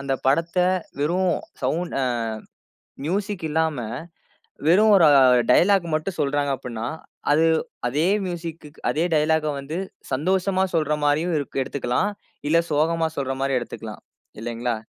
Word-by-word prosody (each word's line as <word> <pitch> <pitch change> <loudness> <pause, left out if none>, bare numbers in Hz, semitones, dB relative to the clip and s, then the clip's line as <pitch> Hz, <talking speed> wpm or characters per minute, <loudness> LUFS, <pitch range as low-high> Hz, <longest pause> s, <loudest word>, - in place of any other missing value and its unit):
அந்த 140 -1 -2
படத்த 165 +6 +1 0.4
வெறும் 175 +4 +1 0.3
சவுண்ட் 165 +7 -1
அ - - +2 1.0
மியூசிக் 195 +1 -2
இல்லாம 160 -1 0 0.9
வெறும் 210 +6 +6
ஒரு 175 - +6 0.5
டயலாக் 190 +6 +4
மட்டும் 160 +4 -2
சொல்றாங்க 145 0 0
அப்புடின்னா, 120 -3 -5 0.5
அது 160 +2 +4 0.4
அதே 150 +7 +1 0.2
மியூசிக், 165 -2 -6 0.2
அதே 160 +3 0
டயலாக்க 155 0 +2
வந்து 150 +5 -5 0.3
சந்தோஷமா 185 +6 +1
சொல்ற 155 -2 +1
மாரியும் 160 +4 +1
இ 145 - 0 0.2
எடுத்துக்கலாம். 130 +9 -1 0.4
இல்ல 165 - +4
சோகமா 160 +2 +2
சொல்றமாரி 135 0 -1
எடுத்துக்கலாம். 115 -2 -8 0.4
இல்லேங்களா? 120 0 -2
155 Hz, 115 wpm, -23 LUFS, 140-175 Hz, 1.0 s, வெறும்